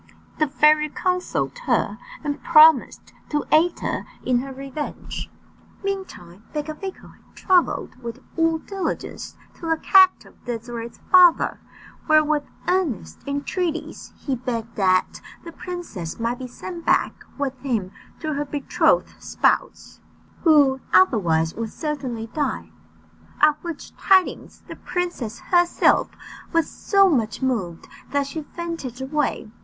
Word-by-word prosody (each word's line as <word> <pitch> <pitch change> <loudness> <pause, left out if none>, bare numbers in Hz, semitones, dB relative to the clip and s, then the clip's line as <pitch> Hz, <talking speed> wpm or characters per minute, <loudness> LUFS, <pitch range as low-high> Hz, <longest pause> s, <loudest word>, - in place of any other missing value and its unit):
The 305 - +3
fairy 300 +2 +4
consoled 365 +9 -2
her, - - +1 0.2
and 290 -1 -3
promised 315 -4 +5 0.2
to 295 -1 -1
aid 335 +3 +3
her - - -3 0.2
in 250 -1 +2
her 270 +2 -6
revenge. 275 +2 -6 0.5
Meantime 370 - -6
Becafico 310 +6 -6
had - - -27
travelled 360 -8 +1
with 235 -1 -6 0.2
all 330 -1 +2
diligence 385 +3 -5 0.2
to 335 - -6
the 325 - +2
capital 375 +2 +5
of - - -31
Désirée's 235 -1 -6
father, 360 -2 +6 0.5
where 310 -1 +6
with 300 -1 -1 0.2
earnest 300 - -1
entreaties 320 +4 -3
he 275 - -2
begged 230 -2 -4
that 185 -2 +1 0.2
the 335 - -8
princess 335 - -7
might 235 +2 -2
be 255 - -6
sent 335 +7 -8
back - - +1
with 275 -2 -2
him 230 -9 -2 0.3
to 310 -1 -2
her 290 +1 -2
betrothed 290 - +1
spouse, - - -1 0.4
who 285 -5 +5
otherwise 165 - +3
would 225 -1 -5
certainly 275 -7 -4
die; 85 - -2 0.7
at 300 0 +5
which 335 -4 -7
tidings 380 -2 +2
the - - -9
princess 345 -11 -3
herself 350 -1 +4 0.4
was 330 -1 +2
so 395 -1 +3
much 240 - 0
moved 195 -11 -2 0.2
that 285 0 0
she 295 +3 -5
fainted 325 -6 -6
away. 265 -4 -2
290 Hz, 130 wpm, -23 LUFS, 240-335 Hz, 0.7 s, father